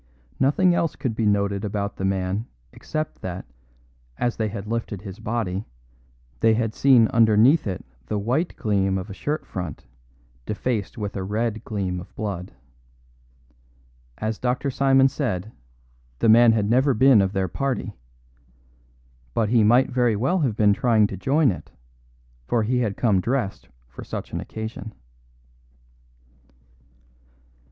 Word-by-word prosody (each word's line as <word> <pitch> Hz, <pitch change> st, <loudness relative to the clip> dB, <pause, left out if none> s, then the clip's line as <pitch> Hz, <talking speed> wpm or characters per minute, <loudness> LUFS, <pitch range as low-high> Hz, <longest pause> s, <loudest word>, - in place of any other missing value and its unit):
Nothing 175 Hz, +7 st, +3 dB
else 165 Hz, -2 st, 0 dB
could 120 Hz, -5 st, -3 dB
be 110 Hz, -1 st, 0 dB
noted 100 Hz, -1 st, +1 dB
about 100 Hz, -1 st, -3 dB
the 95 Hz, -, -2 dB
man 95 Hz, +3 st, -1 dB, 0.3 s
except 155 Hz, 0 st, -5 dB
that, 90 Hz, 0 st, -5 dB, 0.7 s
as 120 Hz, -1 st, 0 dB
they 110 Hz, -, -1 dB
had 100 Hz, -1 st, -6 dB
lifted 110 Hz, -3 st, -4 dB
his 100 Hz, 0 st, -8 dB
body, 110 Hz, -4 st, -2 dB, 0.8 s
they 110 Hz, -1 st, +4 dB
had 110 Hz, -1 st, -1 dB
seen 125 Hz, -4 st, +5 dB
underneath 115 Hz, +6 st, +4 dB
it 95 Hz, -2 st, -4 dB, 0.2 s
the 105 Hz, -, -1 dB
white 125 Hz, -, -1 dB
gleam 95 Hz, -3 st, 0 dB
of 95 Hz, +2 st, -6 dB
a -, -, -5 dB
shirt 150 Hz, +9 st, -3 dB
front 90 Hz, -5 st, -6 dB, 0.6 s
defaced 110 Hz, +1 st, -2 dB
with 105 Hz, -2 st, -4 dB
a 95 Hz, -, -3 dB
red 110 Hz, +2 st, -2 dB
gleam 95 Hz, -4 st, -3 dB
of 90 Hz, -, -12 dB
blood. 95 Hz, -4 st, -4 dB, 1.7 s
As 110 Hz, 0 st, -3 dB
Dr. 125 Hz, +2 st, -1 dB
Simon 135 Hz, 0 st, +4 dB
said, 110 Hz, -8 st, -3 dB, 0.7 s
the 115 Hz, -, +2 dB
man 115 Hz, +1 st, +7 dB
had 105 Hz, -2 st, +1 dB
never 130 Hz, +4 st, +3 dB
been 130 Hz, -2 st, +6 dB
of 95 Hz, 0 st, -1 dB
their 95 Hz, -1 st, 0 dB
party. 130 Hz, +1 st, -3 dB, 1.4 s
But 110 Hz, -2 st, +1 dB
he 115 Hz, -1 st, +4 dB
might 120 Hz, +6 st, +4 dB
very 120 Hz, -3 st, +2 dB
well 135 Hz, -, +1 dB
have 130 Hz, -9 st, 0 dB
been 105 Hz, -1 st, +4 dB
trying 110 Hz, -1 st, +3 dB
to 100 Hz, -, -4 dB
join 135 Hz, -, +2 dB
it, 85 Hz, -4 st, -8 dB, 0.8 s
for 115 Hz, -2 st, +1 dB
he 125 Hz, +3 st, +1 dB
had 110 Hz, -5 st, -1 dB
come 105 Hz, -6 st, +2 dB
dressed 120 Hz, -3 st, -2 dB, 0.2 s
for -, -, -10 dB
such -, -, -7 dB
an -, -, -2 dB
occasion. 110 Hz, -1 st, -7 dB
110 Hz, 145 wpm, -23 LUFS, 100-125 Hz, 1.7 s, man